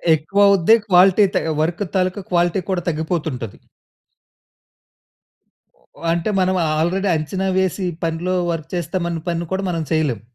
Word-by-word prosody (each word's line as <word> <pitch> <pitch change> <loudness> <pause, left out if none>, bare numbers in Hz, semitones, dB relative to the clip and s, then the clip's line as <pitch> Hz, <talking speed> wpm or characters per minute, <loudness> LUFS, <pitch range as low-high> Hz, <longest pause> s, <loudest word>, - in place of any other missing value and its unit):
ఎక్కువ 160 +6 -3
అవుద్ది. 200 +2 +5
క్వాలిటీ 190 +2 +5
త - - +1
ఆహ్, 155 - -1
వర్క్ 170 +5 -1
తాలూకా 185 +1 0
క్వాలిటీ 175 +1 +2
కూడా 185 -2 0
తగ్గిపోతుంటది. 155 - -3 2.4
ఓహ్! - - -9
అంటే 170 +4 -1
మనం 185 0 +1 0.2
ఆల్రెడీ 185 +5 0
అంచనా 185 +5 -2
వేసి, 190 0 0 0.2
పనిలో 165 +3 -1 0.2
వర్క్ 165 -1 -5
చేస్తామన్న 170 0 -2
పని 170 0 -2
కూడా 190 +1 -1
మనం 165 -2 -2
చేయలేం. 150 -8 0
175 Hz, 135 wpm, -20 LUFS, 160-185 Hz, 2.4 s, అవుద్ది